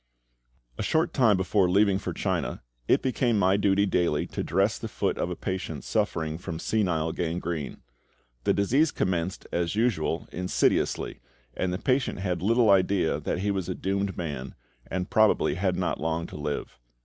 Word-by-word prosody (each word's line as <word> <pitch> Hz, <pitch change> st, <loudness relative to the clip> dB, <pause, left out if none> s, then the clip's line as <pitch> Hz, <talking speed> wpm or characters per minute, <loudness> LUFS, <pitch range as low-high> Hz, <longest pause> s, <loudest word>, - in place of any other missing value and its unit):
A -, -, 0 dB
short 160 Hz, +1 st, +1 dB
time 115 Hz, -7 st, +4 dB
before 95 Hz, 0 st, +2 dB
leaving 100 Hz, +1 st, +3 dB
for -, -, -4 dB
China, -, -, -2 dB, 0.2 s
it -, -, +3 dB
became 125 Hz, -3 st, +1 dB
my 95 Hz, -1 st, +4 dB
duty 100 Hz, 0 st, +3 dB
daily 85 Hz, -6 st, +1 dB
to -, -, -3 dB
dress -, -, +1 dB
the -, -, -4 dB
foot -, -, -1 dB
of -, -, -1 dB
a -, -, -3 dB
patient 95 Hz, 0 st, -4 dB
suffering 80 Hz, 0 st, -1 dB
from 85 Hz, -2 st, -5 dB
senile 85 Hz, -5 st, 0 dB
gangrene. 85 Hz, -2 st, -3 dB, 0.6 s
The -, -, +3 dB
disease 135 Hz, +11 st, +3 dB
commenced, 90 Hz, -6 st, -2 dB
as 85 Hz, +2 st, -1 dB
usual, 100 Hz, -8 st, 0 dB
insidiously, 90 Hz, 0 st, 0 dB, 0.3 s
and 95 Hz, -, -1 dB
the 90 Hz, -, -1 dB
patient 130 Hz, +4 st, 0 dB
had 90 Hz, -3 st, -2 dB
little 115 Hz, +2 st, +4 dB
idea 95 Hz, -3 st, +2 dB
that 90 Hz, -, -2 dB
he 100 Hz, +1 st, +1 dB
was 95 Hz, -2 st, -2 dB
a 90 Hz, -, -2 dB
doomed 100 Hz, 0 st, -2 dB
man, 70 Hz, -6 st, -5 dB, 0.3 s
and 95 Hz, 0 st, -2 dB
probably 110 Hz, -1 st, +4 dB
had 90 Hz, +1 st, 0 dB
not 90 Hz, -4 st, -1 dB
long 80 Hz, +1 st, -1 dB
to -, -, -10 dB
live. 75 Hz, -4 st, -4 dB
95 Hz, 170 wpm, -27 LUFS, 85-100 Hz, 0.6 s, time